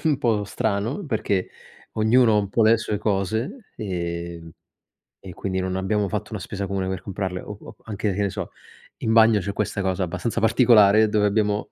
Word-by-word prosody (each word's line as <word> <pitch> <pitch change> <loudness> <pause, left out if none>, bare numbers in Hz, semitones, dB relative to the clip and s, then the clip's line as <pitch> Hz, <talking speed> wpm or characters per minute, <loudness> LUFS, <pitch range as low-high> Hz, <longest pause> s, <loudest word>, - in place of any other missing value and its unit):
un 150 -4 +2
po' 110 -4 +1
strano 110 - -2
perché 105 - -1 0.5
ognuno 110 0 +4
un 100 -2 -1
po' 115 +3 +1
ha 110 - +5
le 115 - +6
sue 105 -2 -3
cose 110 - -2
e 85 -3 -4 0.8
e 95 - -9
quindi 95 -1 -3
non 95 0 -2
abbiamo 100 +2 0
fatto 105 +1 -4
una 110 - -4
spesa 100 +2 -4
comune 95 -1 -2
per 95 -2 -3
comprarle 95 -2 -4
o 105 - -8
o - - -12
anche, 105 -1 -2
che 100 - -2
ne 100 - +1
so, - - -5 0.5
in 110 - +1
bagno 110 -1 +6
c'è 100 +1 -4
questa 100 -1 -2
cosa 95 0 -1
abbastanza 115 +7 -2
particolare 110 -2 +5
dove 105 -1 +2
abbiamo, 105 0 0
105 Hz, 190 wpm, -23 LUFS, 95-110 Hz, 0.8 s, le